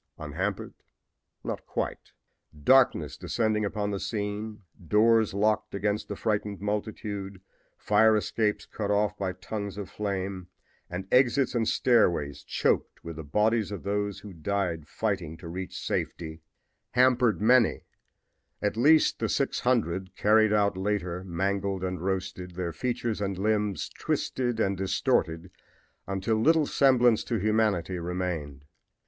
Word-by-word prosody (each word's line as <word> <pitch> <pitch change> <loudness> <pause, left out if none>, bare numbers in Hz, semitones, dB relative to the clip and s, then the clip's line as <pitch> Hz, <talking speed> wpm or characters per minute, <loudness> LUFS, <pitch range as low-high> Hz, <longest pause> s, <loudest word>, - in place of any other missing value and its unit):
Unhampered 90 +7 -3 0.7
not - - -4
quite! - - -4 0.5
Darkness 125 - +4
descending 110 -2 0
upon 105 0 -2
the 100 - -2
scene, 105 0 -4 0.2
doors 110 +3 +4
locked 105 +1 0
against 105 +1 -1
the 100 - -4
frightened 105 -2 -2
multitude, 105 -1 -4 0.4
fire 110 +1 +4
escapes 105 +1 0
cut 105 -2 -4
off 105 0 +2
by 95 -2 -2
tongues 100 +2 -6
of 100 -3 -6
flame 95 -3 -3 0.4
and 90 +2 -5
exits 130 +1 +4
and 115 -3 +1
stairways 85 - +2
choked - - 0
with 85 -1 -7
the 80 - -6
bodies 105 +7 +1
of 100 - -6
those 100 0 -2
who 105 -2 -10
died 85 -2 -2
fighting 95 -7 -2
to 85 - -10
reach 90 +2 -6
safety 80 -1 -3 0.5
hampered 125 -2 +4
many 115 +2 +4 0.8
at 105 0 -1
least 150 +7 +4
the - - -1
six 140 - 0
hundred 95 -7 0
carried 110 0 +4
out 100 -2 +2
later 95 -2 -2
mangled 95 +1 -1
and 90 -2 -3
roasted, 95 -2 -3
their 85 -2 -3
features 120 -4 -2
and 100 -2 -2
limbs 105 0 0
twisted 120 -3 -2
and 100 -3 +1
distorted 90 -2 0 0.6
until 100 +3 0
little 155 +6 +4
semblance 125 -5 +4
to 115 - -1
humanity 105 -4 +1
remained. 85 -5 -4
100 Hz, 130 wpm, -28 LUFS, 95-110 Hz, 0.8 s, Darkness